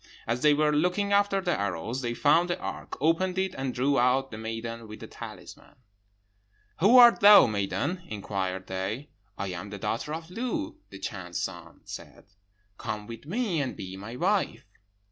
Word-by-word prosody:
As 120 Hz, +2 st, -1 dB
they 150 Hz, -1 st, +5 dB
were 150 Hz, 0 st, +2 dB
looking 180 Hz, +6 st, +1 dB
after 200 Hz, -1 st, +3 dB
the 180 Hz, -2 st, 0 dB
arrows, 100 Hz, -, -2 dB
they 120 Hz, -2 st, -2 dB
found 165 Hz, +6 st, +3 dB
the 175 Hz, -, 0 dB
ark, -, -, -6 dB
opened 165 Hz, +5 st, +1 dB
it, 190 Hz, -1 st, 0 dB
and 135 Hz, -5 st, -3 dB
drew 135 Hz, +2 st, +1 dB
out 130 Hz, +2 st, +2 dB
the 110 Hz, -, -7 dB
maiden 115 Hz, +1 st, -5 dB
with 105 Hz, 0 st, -10 dB
the -, -, -8 dB
talisman. -, -, -11 dB, 1.0 s
"'Who 210 Hz, +9 st, +6 dB
art 240 Hz, -1 st, +9 dB
thou, 205 Hz, -6 st, +9 dB
maiden?' 120 Hz, -, -1 dB
inquired 95 Hz, -, -3 dB
they. 95 Hz, +9 st, -4 dB, 0.3 s
'I 100 Hz, -, -3 dB
am 90 Hz, +2 st, -6 dB
the 100 Hz, -, -6 dB
daughter 115 Hz, +8 st, -3 dB
of 165 Hz, +1 st, -9 dB
Lu.' 295 Hz, -, -3 dB
The -, -, -10 dB
Chan's 95 Hz, -3 st, -5 dB
son 85 Hz, -3 st, -6 dB
said, -, -, -10 dB, 0.5 s
'Come 105 Hz, -2 st, -4 dB
with 115 Hz, +5 st, -10 dB
me, 195 Hz, -4 st, 0 dB
and 130 Hz, -, -3 dB
be 95 Hz, 0 st, -7 dB
my 100 Hz, +5 st, -8 dB
wife.' 190 Hz, -, 0 dB
135 Hz, 175 wpm, -28 LUFS, -, 1.0 s, art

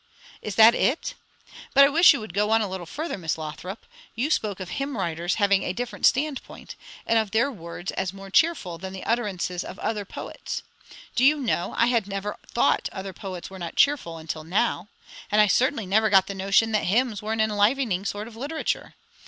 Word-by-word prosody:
"Is 210 Hz, -, -5 dB
that 225 Hz, +2 st, +8 dB
it! 295 Hz, -, 0 dB, 0.6 s
But 275 Hz, -, +9 dB
I -, -, +3 dB
wish 330 Hz, +4 st, +7 dB
you 280 Hz, -, 0 dB
would 215 Hz, -5 st, -8 dB
go 210 Hz, +2 st, +1 dB
on 225 Hz, 0 st, +4 dB
a 215 Hz, -, -1 dB
little 185 Hz, -2 st, -6 dB
further, 310 Hz, -, -4 dB
Miss 165 Hz, -2 st, -2 dB
Lothrop. 160 Hz, +6 st, -7 dB, 0.3 s
You 260 Hz, +7 st, -1 dB
spoke 205 Hz, -9 st, 0 dB
of 185 Hz, -2 st, -6 dB
hymn 275 Hz, -2 st, -3 dB
writers 170 Hz, -1 st, -1 dB
having 200 Hz, -2 st, +3 dB
a 180 Hz, -, -2 dB
different 245 Hz, +3 st, 0 dB
standpoint, 280 Hz, 0 st, -2 dB, 0.3 s
and 230 Hz, -, +3 dB
of 220 Hz, -2 st, -1 dB
their 230 Hz, +7 st, +1 dB
words 175 Hz, -3 st, -7 dB
as 190 Hz, -1 st, -2 dB
more 195 Hz, 0 st, -11 dB
cheerful 195 Hz, -, +2 dB
than 190 Hz, 0 st, -7 dB
the 190 Hz, -, -7 dB
utterances 195 Hz, -6 st, -1 dB
of -, -, -9 dB
other 210 Hz, -1 st, -2 dB
poets. 200 Hz, -, -7 dB, 0.5 s
Do 245 Hz, -, +2 dB
you 295 Hz, +3 st, +5 dB
know, 230 Hz, -9 st, -1 dB
I 235 Hz, -, +5 dB
had 230 Hz, -4 st, +1 dB
never 200 Hz, +1 st, -4 dB
thought -, -, +1 dB
other 190 Hz, 0 st, -6 dB
poets 185 Hz, -1 st, -7 dB
were 190 Hz, -, -9 dB
not 170 Hz, -1 st, -6 dB
cheerful, 270 Hz, -, +2 dB
until 160 Hz, 0 st, -6 dB
now; 190 Hz, +2 st, 0 dB, 0.4 s
and 210 Hz, -, +3 dB
I 210 Hz, -, +7 dB
certainly 245 Hz, +2 st, +1 dB
never 215 Hz, +4 st, +2 dB
got 195 Hz, -2 st, +5 dB
the 200 Hz, -, -5 dB
notion 195 Hz, +3 st, +2 dB
that 215 Hz, -, +1 dB
hymns 220 Hz, +2 st, +1 dB
were 215 Hz, +1 st, -2 dB
an 225 Hz, -, -3 dB
enlivening 215 Hz, -1 st, +2 dB
sort 205 Hz, +2 st, -3 dB
of 230 Hz, -, -12 dB
literature. 290 Hz, +7 st, -3 dB
210 Hz, 205 wpm, -25 LUFS, 190-240 Hz, 0.6 s, But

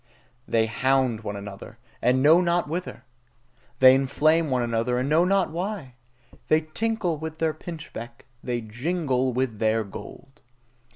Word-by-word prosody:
They 115 Hz, -1 st, +2 dB
hound 130 Hz, 0 st, +1 dB
one 105 Hz, -2 st, -5 dB
another, 100 Hz, +2 st, -9 dB, 0.2 s
and 125 Hz, +2 st, +2 dB
know 160 Hz, +4 st, +6 dB
not 175 Hz, -1 st, +1 dB
whither! 175 Hz, +4 st, -5 dB, 0.7 s
They 130 Hz, 0 st, +8 dB
inflame 150 Hz, +4 st, +2 dB
one 125 Hz, -2 st, +1 dB
another, 115 Hz, +1 st, 0 dB
and 130 Hz, +2 st, -1 dB
know 160 Hz, +4 st, +4 dB
not 195 Hz, -2 st, +2 dB
why! 175 Hz, -6 st, -4 dB, 0.5 s
They 155 Hz, 0 st, +4 dB
tinkle 180 Hz, +1 st, -2 dB
with 160 Hz, +1 st, -6 dB
their 160 Hz, -1 st, 0 dB
pinchbeck, 150 Hz, -8 st, -9 dB, 0.2 s
they 120 Hz, -1 st, -2 dB
jingle 130 Hz, +3 st, -1 dB
with 125 Hz, -3 st, -2 dB
their 110 Hz, 0 st, +2 dB
gold. 135 Hz, +7 st, -11 dB
135 Hz, 140 wpm, -25 LUFS, 120-165 Hz, 0.7 s, They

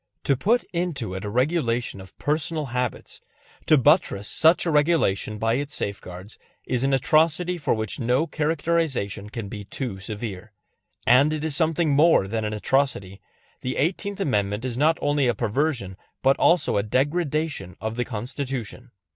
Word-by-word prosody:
To 140 Hz, -, +2 dB
put 230 Hz, -, +2 dB
into 165 Hz, -, -2 dB
it 95 Hz, +1 st, -5 dB
a 105 Hz, -, -3 dB
regulation 125 Hz, -, 0 dB
of 95 Hz, -, -15 dB
personal 155 Hz, +1 st, -1 dB
habits, 125 Hz, -1 st, -4 dB, 0.5 s
to 155 Hz, -, +6 dB
buttress 135 Hz, -, +3 dB
such 165 Hz, +3 st, +3 dB
a 170 Hz, -, +1 dB
regulation 145 Hz, -, +2 dB
by 115 Hz, +1 st, +1 dB
its 145 Hz, +3 st, -2 dB
safeguards, 95 Hz, 0 st, -6 dB, 0.3 s
is 125 Hz, 0 st, -1 dB
an 135 Hz, -, +2 dB
atrocity 160 Hz, +6 st, +2 dB
for 150 Hz, -, +1 dB
which 110 Hz, -2 st, -3 dB
no 125 Hz, +5 st, +2 dB
characterization 155 Hz, -10 st, -1 dB
can 110 Hz, -1 st, -6 dB
be 105 Hz, +1 st, -7 dB
too 105 Hz, -1 st, -5 dB
severe. 105 Hz, 0 st, -6 dB, 0.5 s
And 135 Hz, +5 st, +5 dB
it 155 Hz, -1 st, -3 dB
is 160 Hz, -3 st, -1 dB
something 160 Hz, 0 st, +1 dB
more 145 Hz, -, +4 dB
than 110 Hz, +2 st, -2 dB
an 105 Hz, 0 st, -2 dB
atrocity; 105 Hz, -5 st, -1 dB, 0.4 s
the 130 Hz, +1 st, -3 dB
Eighteenth 195 Hz, +6 st, -1 dB
Amendment 105 Hz, -, 0 dB
is 125 Hz, -2 st, -3 dB
not 155 Hz, +5 st, +3 dB
only 145 Hz, -2 st, +2 dB
a 120 Hz, -, +1 dB
perversion 120 Hz, -5 st, -1 dB, 0.3 s
but 135 Hz, +1 st, +5 dB
also 170 Hz, -10 st, +3 dB
a -, -, +3 dB
degradation 145 Hz, -, -1 dB
of 110 Hz, +2 st, -4 dB
the 125 Hz, -, 0 dB
Constitution. 125 Hz, +1 st, -5 dB
130 Hz, 160 wpm, -24 LUFS, 110-155 Hz, 0.5 s, to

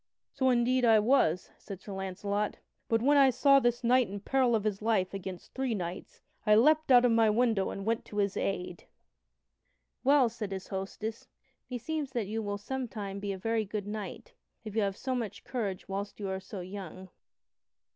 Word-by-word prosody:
"So 260 Hz, -1 st, +1 dB
indeed 250 Hz, +1 st, +2 dB
I 225 Hz, -2 st, +6 dB
was," 210 Hz, -, +2 dB
said 195 Hz, -3 st, -8 dB
Sir 200 Hz, +1 st, -9 dB
Launcelot, 200 Hz, +2 st, -2 dB, 0.3 s
"but 225 Hz, 0 st, +2 dB
when 290 Hz, +2 st, +5 dB
I 275 Hz, -1 st, +7 dB
saw 275 Hz, +2 st, +5 dB
this 240 Hz, -1 st, 0 dB
knight 245 Hz, -2 st, +4 dB
in 200 Hz, +1 st, -5 dB
peril 250 Hz, +2 st, +2 dB
of 215 Hz, -, 0 dB
his 210 Hz, -2 st, -2 dB
life 210 Hz, -4 st, +1 dB
against 190 Hz, -2 st, -7 dB
three 260 Hz, -3 st, -1 dB
knights, 175 Hz, -2 st, -6 dB, 0.2 s
I 210 Hz, -1 st, +5 dB
leaped 305 Hz, +5 st, +4 dB
out 250 Hz, -1 st, +7 dB
of 245 Hz, -, +4 dB
my 225 Hz, -1 st, +4 dB
window 220 Hz, -3 st, +2 dB
and 195 Hz, -, -6 dB
went 225 Hz, +1 st, 0 dB
to 210 Hz, -, -9 dB
his 200 Hz, -1 st, +1 dB
aid." 180 Hz, -3 st, -3 dB, 1.2 s
"Well," 275 Hz, -1 st, +5 dB
said 220 Hz, -3 st, -5 dB
his 190 Hz, -1 st, -6 dB
hostess, 205 Hz, +3 st, -5 dB, 0.4 s
"meseems 270 Hz, +3 st, -3 dB
that 235 Hz, -4 st, -1 dB
you 220 Hz, +3 st, -3 dB
will 205 Hz, -1 st, -3 dB
sometime 210 Hz, -4 st, -5 dB
be 200 Hz, 0 st, -3 dB
a 195 Hz, -, -4 dB
very 225 Hz, +3 st, 0 dB
good 205 Hz, 0 st, -4 dB
knight, 215 Hz, -, -6 dB, 0.3 s
if 215 Hz, -2 st, -7 dB
you 220 Hz, -, +2 dB
have 195 Hz, -1 st, -1 dB
so 260 Hz, -, -2 dB
much 235 Hz, -5 st, -4 dB
courage 205 Hz, -7 st, -4 dB
whilst 200 Hz, +2 st, -5 dB
you 200 Hz, -2 st, -3 dB
are 190 Hz, 0 st, -2 dB
so 190 Hz, 0 st, -8 dB
young." 185 Hz, 0 st, -8 dB
215 Hz, 190 wpm, -30 LUFS, 195-245 Hz, 1.2 s, I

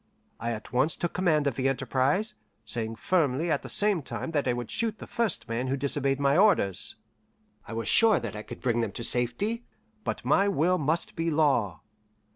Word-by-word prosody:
I 115 Hz, -, -2 dB
at 110 Hz, +1 st, -8 dB
once 135 Hz, +6 st, +2 dB
took 175 Hz, -, -3 dB
command 160 Hz, -5 st, +2 dB
of 140 Hz, -, +1 dB
the 130 Hz, +2 st, 0 dB
enterprise, 135 Hz, -, 0 dB, 0.3 s
saying 110 Hz, 0 st, -2 dB
firmly 160 Hz, +2 st, +1 dB
at -, -, +1 dB
the -, -, -9 dB
same 205 Hz, -4 st, +2 dB
time 155 Hz, -, -5 dB
that 145 Hz, -4 st, 0 dB
I 125 Hz, -, +2 dB
would 120 Hz, -1 st, -5 dB
shoot 225 Hz, -2 st, -1 dB
the -, -, -9 dB
first 195 Hz, -, -1 dB
man 115 Hz, +3 st, -2 dB
who 135 Hz, +1 st, 0 dB
disobeyed 140 Hz, 0 st, 0 dB
my 140 Hz, 0 st, +3 dB
orders. 170 Hz, -, +2 dB, 0.7 s
I -, -, -7 dB
was 115 Hz, -1 st, -3 dB
sure 225 Hz, -1 st, +5 dB
that -, -, -6 dB
I 105 Hz, -, -5 dB
could -, -, -10 dB
bring 120 Hz, -2 st, +1 dB
them 110 Hz, -4 st, -2 dB
to 115 Hz, -, -6 dB
safety, 125 Hz, -, 0 dB, 0.4 s
but -, -, -4 dB
my 200 Hz, -, +4 dB
will 180 Hz, -1 st, +2 dB
must 155 Hz, +3 st, -1 dB
be 165 Hz, 0 st, -1 dB
law. 140 Hz, -, +1 dB
140 Hz, 200 wpm, -28 LUFS, 120-175 Hz, 0.7 s, sure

